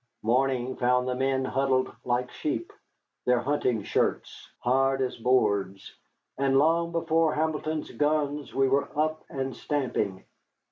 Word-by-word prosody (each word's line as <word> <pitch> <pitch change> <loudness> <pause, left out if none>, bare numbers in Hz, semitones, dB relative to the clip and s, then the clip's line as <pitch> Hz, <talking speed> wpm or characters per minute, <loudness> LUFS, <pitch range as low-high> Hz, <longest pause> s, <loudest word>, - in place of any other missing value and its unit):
Morning 130 +2 +1
found 125 0 +2
the 130 - 0
men 130 +1 0
huddled 130 -1 0
like 125 0 -1
sheep, 115 -7 -3 0.5
their 125 0 +4
hunting 125 -4 0
shirts - - -2
hard 135 +2 +2
as 130 -1 -1
boards, 100 -6 0 0.5
and 135 -1 +3
long 165 +3 +3
before 165 -1 +1
Hamilton's 155 0 -2
gun 150 -1 0
we 135 0 +3
were 140 +2 +1
up 155 0 0
and 135 -1 -4
stamping. 120 -10 -2
135 Hz, 130 wpm, -27 LUFS, 125-150 Hz, 0.5 s, their